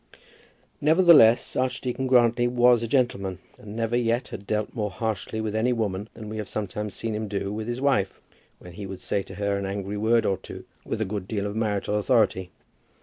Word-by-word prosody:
Nevertheless 155 -7 +6
Archdeacon 130 0 -1
Grantly 120 -1 +4
was 120 -1 +4
a 115 - -2
gentleman, 110 -7 0 0.2
and 105 0 -10
never 115 +1 -1
yet 120 +1 0
had 100 - -8
dealt 105 -1 -1
more 105 -3 -2
harshly 110 -1 -3
with 110 -1 -3
any 115 +3 +2
woman 105 -2 -2
than 110 -1 -9
we 110 +1 -5
have 105 - -5
sometimes 105 0 -4
seen 115 -1 -3
him 110 0 -3
do 100 0 -3
with 110 +1 -4
his 120 +2 -3
wife, 105 -9 +1 0.4
when 90 - -13
he 100 +2 -7
would 95 -1 -8
say 100 - -1
to 95 - -11
her 100 0 -1
an 100 - -3
angry 100 +1 -4
word 110 +2 +2
or 95 - +1
two - - -10 0.2
with 110 - -4
a - - +1
good 100 -1 -4
deal 100 -2 -2
of 100 0 -4
marital 105 -1 0
authority. 105 -5 +2
110 Hz, 205 wpm, -25 LUFS, 100-120 Hz, 0.4 s, Nevertheless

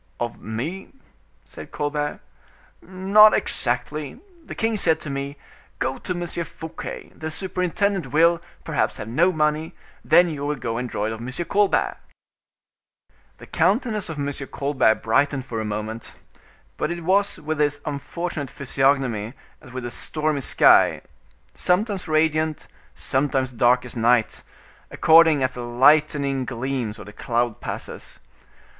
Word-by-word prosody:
"Of 120 -2 -4
me?" 155 - -5 0.5
said - - -11
Colbert. 145 0 -3 0.6
"Not 195 +4 +5
exactly. 140 +4 -2 0.2
The - - -9
king 225 -1 0
said 165 -6 +2
to 150 - -6
me: 140 +1 -4 0.4
'Go - - -2
to - - -3
M. 175 - -3
Fouquet; 165 -1 -7
the 155 - -5
superintendent 185 0 -1
will, 165 +3 +4 0.2
perhaps, - - -1
have 105 - -6
no 165 +11 +3
money, 155 0 -1 0.3
then 175 +3 +5
you 145 -3 -5
will 150 +1 -1
go 115 -3 -4
and 125 0 -4
draw 105 - -2
it 110 - -2
of 110 - -7
M. 120 - -5 0.2
Colbert.'" 205 +1 +1 1.4
The - - -12
countenance 210 - 0
of 160 - -5
M. 145 0 -2 0.2
Colbert 140 -6 +2
brightened 130 +4 +1
for 115 -4 -4
a - - -4
moment; 110 +2 -5 0.6
but 150 - -1
it 170 0 -4
was 200 +4 +2
with 155 0 -4
his 145 -1 +1
unfortunate 150 0 -4
physiognomy 135 -4 0 0.3
as - - -14
with 130 -1 -6
a 120 - -4
stormy 155 0 0
sky, - - +5 0.5
sometimes 195 +1 0
radiant, 155 0 +1 0.3
sometimes 135 -1 0
dark 125 +1 +3
as 125 - -7
night, 115 -1 +2 0.5
according 160 -3 +5
as 130 - 0
the 125 - -6
lightening 135 +2 +3
gleams 125 -3 -3
or - - -10
the 105 - -11
cloud 120 +1 -1
passes. - - -6
145 Hz, 140 wpm, -23 LUFS, 125-165 Hz, 1.4 s, Not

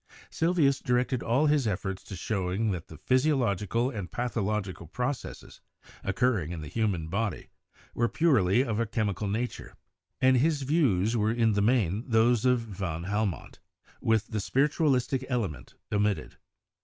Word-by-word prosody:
Sylvius 160 -5 +2
directed 125 0 0
all 125 +6 +2
his 145 -5 +2
efforts 95 -1 -3
to 95 - -7
showing 95 +3 -1
that 85 -4 -5
the 80 - -11
physiological 125 - +1
and 100 - -6
pathological 105 -7 -2
processes 125 - -5 0.4
occurring 95 -5 0
in 85 -3 -5
the 75 - -7
human 95 -5 -1
body 100 +3 -3 0.4
were 120 0 +1
purely 125 - +3
of 115 -5 -2
a 115 - 0
chemical 105 -1 -1
nature, 115 +5 -4 0.4
and 130 0 +5
his 145 +2 +1
views 120 - +2
were 110 -1 +2
in 115 -2 +2
the 100 - +1
main 105 -3 +2
those 115 +1 +3
of 125 -2 +3
van 95 -7 -5
Helmont, 105 -1 -2 0.4
with 110 -1 +1
the 110 - -2
spiritualistic 135 +1 +1
element 95 - -3 0.2
omitted. 105 -1 0
110 Hz, 145 wpm, -28 LUFS, 100-125 Hz, 0.4 s, and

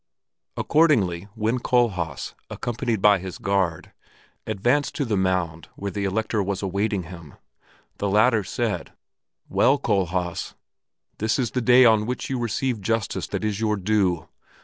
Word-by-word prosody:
Accordingly 100 - +2
when 115 +3 0
Kohlhaas, 95 - 0 0.2
accompanied 120 -3 -2
by 105 -2 +6
his 95 0 -7
guard, 95 -5 -1 0.5
advanced 120 +8 +1
to 145 - -1
the 110 -4 0
mound 90 -4 -1
where 100 0 -4
the 100 0 -2
Elector 110 +2 0
was 100 0 -2
awaiting 100 0 -1
him, 85 -3 -11 0.6
the 100 - 0
latter 110 +2 +4
said, - - -3 0.5
"Well, 135 +3 +3
Kohlhaas, 90 -7 -1 0.6
this 110 +1 +1
is 125 -5 -1
the 125 - -1
day 125 +2 +6
on 110 -2 +4
which 125 +5 -3
you 130 - -1
receive 120 0 -1
justice 115 +1 -1
that - - -4
is 105 -1 -1
your 110 -1 +1
due. 95 -4 +1
105 Hz, 145 wpm, -24 LUFS, 95-120 Hz, 0.6 s, by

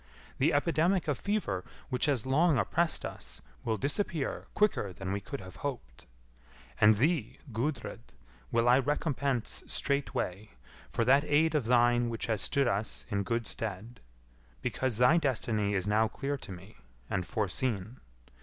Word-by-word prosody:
The - - +4
epidemic 170 +4 +2
of 145 -4 0
fever 200 - -1 0.3
which 125 +2 +2
has 135 -6 +1
long 150 +3 +3
oppressed 160 - +1
us - - -7 0.2
will 110 -2 0
disappear 145 - -2
quicker 210 - +2
than 95 +1 -5
we 100 - -1
could - - -6
have 95 0 -11
hoped. 120 - -6 0.7
And 105 0 +7
thee, 140 +1 0
Gudrid, 120 +3 -2 0.5
will 115 +1 +2
I 125 +2 +6
recompense 140 -3 -1
straightway, 110 - -2 0.4
for 115 - 0
that 135 +3 +5
aid 155 +2 +3
of 145 -7 0
thine 120 0 +4
which 115 -1 -3
has 110 -3 -1
stood 140 -2 +2
us 105 -1 -1
in 100 -1 +1
good 115 +3 -1
stead; 110 +2 -4 0.6
because 130 -4 -1
thy 125 +8 +5
destiny 110 -8 +1
is 95 -2 0
now 110 +2 +3
clear 140 +6 -3
to 130 - -9
me, 95 - -11 0.3
and 95 - -1
foreseen. 110 +3 -2
120 Hz, 150 wpm, -31 LUFS, 105-145 Hz, 0.7 s, And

